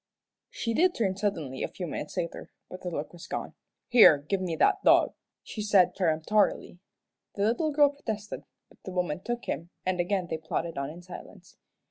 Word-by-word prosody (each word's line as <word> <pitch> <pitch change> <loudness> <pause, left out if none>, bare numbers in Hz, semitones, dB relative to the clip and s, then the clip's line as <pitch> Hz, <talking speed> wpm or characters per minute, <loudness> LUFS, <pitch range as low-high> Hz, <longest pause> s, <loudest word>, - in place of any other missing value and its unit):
She 230 - -3
did 355 +8 +3
turn 195 -5 0
suddenly 165 -10 -2
a - - 0
few 180 - -6
minutes 155 +1 -6
later, 170 -2 -4 0.2
but 185 - -8
the 180 - -3
look 155 -1 -5
was 170 - -11
gone. - - -4 0.3
"Here, 240 - +8
give 170 +7 -2
me 175 -3 -2
that 395 - +3
dog," - - +5 0.3
she 215 - -6
said, 205 -3 +4
peremptorily. 180 +2 +1 0.6
The 200 - -1
little 245 +9 +1
girl 290 -1 +5
protested, 220 -7 -5 0.2
but - - -23
the 190 - -7
woman 180 -3 -1
took 240 0 -3
him, 170 +2 -4 0.2
and 185 -1 0
again 180 +1 0
they 160 - -3
plodded 165 +1 -3
on 140 0 -3
in 170 +3 -10
silence. 180 0 -12
185 Hz, 185 wpm, -28 LUFS, 165-215 Hz, 0.6 s, Here